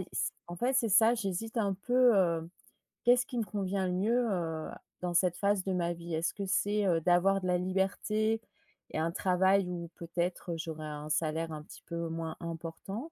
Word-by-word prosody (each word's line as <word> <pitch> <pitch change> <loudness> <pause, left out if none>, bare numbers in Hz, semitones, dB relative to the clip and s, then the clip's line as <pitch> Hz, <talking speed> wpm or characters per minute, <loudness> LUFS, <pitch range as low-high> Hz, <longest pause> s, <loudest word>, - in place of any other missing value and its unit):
i 185 - -5 0.4
en 175 - -6
fait, 250 +7 0
c'est 245 -3 +3
ça, 225 +4 +6
j'hésite 225 +1 -3
un 200 -3 +1
peu, 245 +4 +4
heu. 170 -4 +2 0.6
Qu'est-ce 245 +1 +4
qui 245 - -5
me 230 - +1
convient 195 -2 -2
le 180 - -1
mieux 230 +7 +2
heu, 160 -3 -2
a - - -11 0.2
dans 180 -1 -2
cette 175 0 +3
phase 200 -1 +1
de 190 0 -1
ma 175 -1 0
vie? 170 -1 -5
Est-ce 165 +2 0
que 200 -1 -4
c'est, 205 +2 +1
heu, 170 -3 +3
d'avoir 180 +3 +4
de 185 - -2
la 180 0 +3
liberté 210 +4 0 0.5
et - - -4
un 160 +1 0
travail 190 +1 +3
où, 170 -1 -5
peut-être, 170 +1 -3
j'aurais 160 -1 -5
un 150 0 -6
salaire 160 +1 0
un 155 -1 -5
petit - - -14
peu 170 0 -3
moins 165 -1 -4
important? 170 - -6
185 Hz, 200 wpm, -31 LUFS, 170-205 Hz, 0.6 s, ça